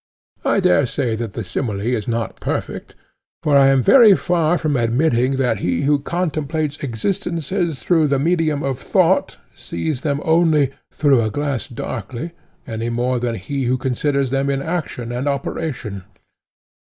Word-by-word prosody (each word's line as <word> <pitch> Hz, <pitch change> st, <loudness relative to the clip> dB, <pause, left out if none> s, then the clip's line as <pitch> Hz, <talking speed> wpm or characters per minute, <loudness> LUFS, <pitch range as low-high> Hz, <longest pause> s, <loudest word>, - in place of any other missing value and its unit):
I -, -, +2 dB
dare 180 Hz, -7 st, +3 dB
say 120 Hz, -2 st, -1 dB
that 115 Hz, -3 st, -5 dB
the 115 Hz, -, -4 dB
simile 105 Hz, +1 st, -3 dB
is 115 Hz, -1 st, -1 dB
not 115 Hz, -1 st, -2 dB
perfect—for 150 Hz, -2 st, -4 dB
I 135 Hz, -1 st, +7 dB
am 135 Hz, -2 st, +4 dB
very 230 Hz, -, +7 dB
far 175 Hz, -1 st, +1 dB
from 155 Hz, -3 st, -1 dB
admitting 125 Hz, +2 st, +2 dB
that 125 Hz, -6 st, 0 dB
he 85 Hz, -3 st, -1 dB
who 145 Hz, +1 st, +3 dB
contemplates 155 Hz, -2 st, -2 dB
existences 165 Hz, -, -2 dB
through 160 Hz, 0 st, +3 dB
the 140 Hz, -1 st, +1 dB
medium 155 Hz, -1 st, +1 dB
of 135 Hz, -2 st, -2 dB
thought, -, -, +2 dB, 0.2 s
sees 125 Hz, -, -4 dB
them 145 Hz, -2 st, -1 dB
only 160 Hz, -4 st, +3 dB, 0.2 s
'through 140 Hz, -5 st, +3 dB
a 110 Hz, -, 0 dB
glass 140 Hz, +2 st, -2 dB
darkly,' 120 Hz, -, -5 dB, 0.3 s
any 115 Hz, +1 st, -3 dB
more 120 Hz, +1 st, 0 dB
than 120 Hz, -1 st, -2 dB
he 135 Hz, +7 st, -3 dB
who 125 Hz, +2 st, +1 dB
considers 135 Hz, +1 st, -1 dB
them 135 Hz, +1 st, 0 dB
in 135 Hz, 0 st, -1 dB
action 155 Hz, -8 st, -3 dB
and 125 Hz, +4 st, -3 dB
operation. 135 Hz, -, -3 dB
135 Hz, 155 wpm, -20 LUFS, 120-155 Hz, 0.3 s, I